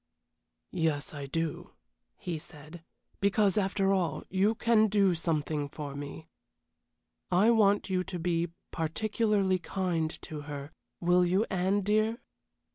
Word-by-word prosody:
"Yes, 160 0 0
I 140 -2 -6
do," 165 +2 -3 0.4
he 170 -3 -4
said, 155 +1 -11 0.4
"because, 200 -1 +3
after 195 -1 +2
all, 170 -6 -1
you 195 +4 +2
can 220 -1 +4
do 200 -3 +3
something 155 -3 -1
for 145 -1 -6
me. 145 +3 -7 1.0
I 195 +6 +4
want 205 -3 +3
you 185 -1 +1
to 190 -2 -5
be 170 0 0 0.2
particularly 195 +3 +1
kind 175 -4 -1
to 150 -1 -6
her, 145 0 -6 0.3
will 180 +1 +4
you, 185 +5 +2
Anne, 190 +2 +1
dear?" 215 +3 +1
180 Hz, 125 wpm, -30 LUFS, 160-200 Hz, 1.0 s, can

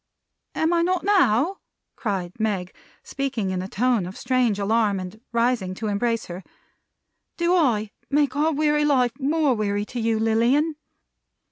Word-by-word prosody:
"Am 320 +2 +1
I 340 - +3
not 360 +1 0
now?" 365 - +3 0.4
cried 190 -4 -4
Meg, 200 -5 -2 0.3
speaking 255 -8 -3
in 185 -1 -2
a 185 - -5
tone 230 -2 0
of 185 - -9
strange 245 -4 +1
alarm, 205 -1 +1
and 185 +4 -8
rising 235 -5 0
to 220 - -6
embrace 230 +3 -1
her. 180 +2 -8 0.9
"Do 345 +1 +2
I 225 - +1 0.2
make 285 -2 +1
our 305 +2 +2
weary 300 0 +1
life 260 -5 +3
more 295 0 +2
weary 205 -2 -1
to 245 +3 -6
you, 225 -1 +1
Lilian?" 235 +8 +2
235 Hz, 150 wpm, -23 LUFS, 205-295 Hz, 0.9 s, I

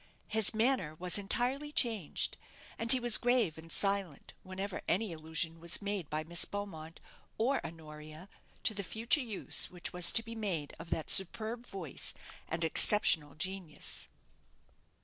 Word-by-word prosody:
His 220 -1 +3
manner 220 - +1
was 180 +4 +2
entirely 255 +8 -2
changed, 225 - -1 0.4
and 230 +1 +1
he 260 - +5
was 240 -2 +6
grave 240 -9 +1
and 165 +1 -12
silent 195 -7 -2
whenever 190 +1 -6
any 195 +1 0
allusion 160 +1 -4
was 170 -1 -1
made 200 -6 -4
by 155 +1 -3
Miss 170 +1 -1
Beaumont 170 -6 -5 0.4
or 260 +5 0
Honoria 155 +1 -10 0.4
to - - 0
the 200 - -3
future 225 +8 0
use 225 -6 +1
which 180 +1 -7
was 180 -1 +8
to 230 - +2
be 230 0 -9
made 190 -10 -4
of 165 - -10
that 160 - -1
superb 220 +5 +6
voice 180 -8 -5 0.3
and 165 +1 -3
exceptional 160 -3 +2
genius. 185 -1 -4
190 Hz, 150 wpm, -32 LUFS, 160-220 Hz, 0.4 s, was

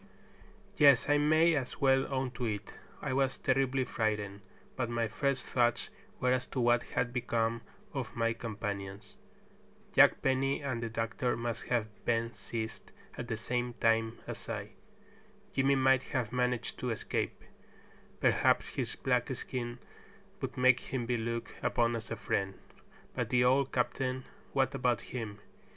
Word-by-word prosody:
Yes, 140 -5 +6
I 145 0 +5
may 155 +3 +5
as 135 -4 -2
well 135 -1 +3
own 130 -1 -1
to 125 -1 -4
it: 105 -2 -4 0.3
I - - -1
was 135 0 +1
terribly 135 -1 +2
frightened, 105 -4 -2 0.3
but 125 -2 -1
my 115 -1 0
first 140 +4 -1
thoughts 120 -2 +1 0.3
were 125 - +2
as 130 0 +1
to 130 - -4
what 120 0 +4
had 125 0 -2
become 115 -2 0 0.3
of - - -4
my 115 0 +1
companions. 100 -3 -5 0.8
Jack - - +6
Penny 135 +2 +1
and 130 -4 -2
the 115 - -2
doctor 115 +2 -1
must 120 0 -3
have 120 -3 +1 0.2
been 115 0 +1
seized 110 +1 -6 0.2
at 120 - -5
the 115 -3 -2
same 120 +1 -2
time 115 0 +2
as - - -7
I. - - -4 0.8
Jimmy 135 +1 +3
might 130 -1 +4 0.2
have 120 -2 -2
managed 125 -3 0
to - - -2
escape. - - -2 0.8
Perhaps - - +3
his - - -3
black 125 -2 +1
skin 120 -1 -4 0.6
would - - -4
make 125 -1 +5
him 125 -2 -3
be 120 +1 0
looked 115 0 -3
upon 120 0 +2
as 115 - -6
a 115 - -2
friend. 95 -2 -1 0.6
But - - -2
the 125 -1 +4
old 130 +2 +3
captain, 130 +1 -1 0.3
what 135 0 +2
about 125 -3 +1
him? 110 -5 -5
120 Hz, 155 wpm, -32 LUFS, 115-130 Hz, 0.8 s, Yes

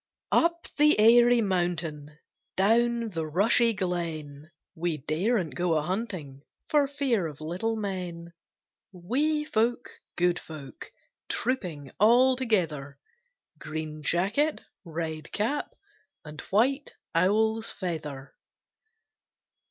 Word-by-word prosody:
UP 340 0 +2
the 300 +1 +6
airy 240 +2 +6
mountain, 170 -6 -2 0.4
Down 230 +3 +2
the 165 -5 -3
rushy 220 +8 +4
glen, 160 -6 -4 0.2
We 170 -2 -2
daren't 170 - -1
go 175 -2 0
a 150 - 0
hunting 180 - -4 0.3
For 290 -2 +3
fear 270 - 0
of 150 -2 -10
little 180 +9 -2
men; 180 -5 -5 0.6
Wee 280 - 0
folk, 235 -2 0 0.2
good 175 0 +2
folk, 140 -6 -10 0.4
Trooping 180 - -3
all 245 +5 +5
together; 165 - -1 0.6
Green 155 0 -5
jacket, 205 - +1 0.2
red 160 -2 -5
cap, 255 +8 -2 0.5
And 150 -1 -8
white 265 +8 +1 0.2
owl's 220 +6 +2
feather! 150 -7 -5
185 Hz, 100 wpm, -27 LUFS, 155-235 Hz, 0.6 s, the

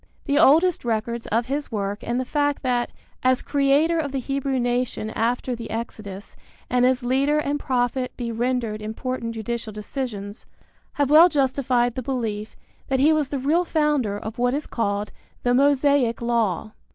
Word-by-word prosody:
The 285 -1 +2
oldest 330 +4 +5
records 235 0 -2
of 230 +2 +1
his 280 +2 -3
work 205 -1 -2
and 240 +2 -2
the 255 - -2
fact 290 +1 0
that, 245 -2 0 0.3
as 255 0 +2
creator 290 +4 +2
of 290 -3 -2
the 275 - -2
Hebrew 275 0 -1
nation 245 -2 -1
after 245 +3 -1
the 230 -1 -8
Exodus 215 -3 -6 0.4
and 250 0 +4
as 255 -1 +1
leader 270 +4 +2
and 290 -1 -1
prophet 250 0 -1
be 235 -2 -3
rendered 230 -2 -1
important 230 +2 -4
judicial 225 0 -4
decisions, 210 -1 -6 0.5
have 285 -1 0
well 325 +4 +8
justified 260 -4 +1
the 255 - -4
belief 225 -5 -3 0.3
that 265 -2 0
he 300 +4 +5
was 300 -3 0
the 285 - -2
real 300 +7 +2
founder 300 - +1
of 220 +2 -7
what 245 +2 +2
is 300 - -3
called 205 -2 -2 0.3
the 245 - +2
Mosaic 280 -2 +3
Law. 230 -4 0
250 Hz, 165 wpm, -23 LUFS, 230-280 Hz, 0.5 s, well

